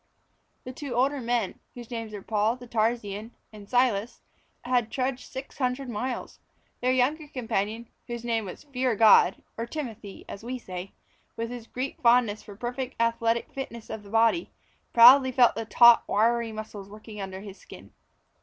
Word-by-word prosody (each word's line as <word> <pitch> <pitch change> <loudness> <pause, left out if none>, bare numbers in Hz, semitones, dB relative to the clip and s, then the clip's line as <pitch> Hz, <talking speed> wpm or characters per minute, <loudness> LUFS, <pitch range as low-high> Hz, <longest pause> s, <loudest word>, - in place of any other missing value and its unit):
The 255 - -7
two 265 -2 -6
older 270 +3 +1
men, 235 -4 -1 0.2
whose 240 -1 -10
names 230 -2 -5
were 205 -2 -8
Paul 215 +1 +1
the 250 - -12
Tarsian 220 -1 -1 0.2
and 205 -1 -12
Silas, 245 -3 +1 0.4
had 245 -2 +1
trudged 260 0 -3
six 265 +2 -8
hundred 255 0 -1
miles. 245 +3 -4 0.4
Their 250 +1 +2
younger 285 +5 +1
companion, 225 -3 -3 0.2
whose 235 -1 -5
name 225 -2 0
was 185 - -9
"Fear 260 -4 -1
God," 210 -3 +5 0.2
or 230 - -3
Timothy 230 -8 -7
as 200 - -9
we 250 +2 -4
say, 185 -4 -8 0.4
with 230 +1 -3
his 240 -2 -8
Greek 260 +2 -5
fondness 235 -3 +3
for 205 - -12
perfect 245 +3 -5
athletic 230 0 0
fitness 235 -4 -7
of 220 -1 -5
the 205 - -14
body, 225 +9 +2 0.4
proudly 260 +3 +8
felt 245 -1 +5
the 225 - -4
taut, 235 +1 +7
wiry 230 +2 +1
muscles 215 -2 -8
working 210 0 -10
under 190 0 -6
his 200 -1 -10
skin. - - -14
235 Hz, 165 wpm, -27 LUFS, 215-250 Hz, 0.4 s, proudly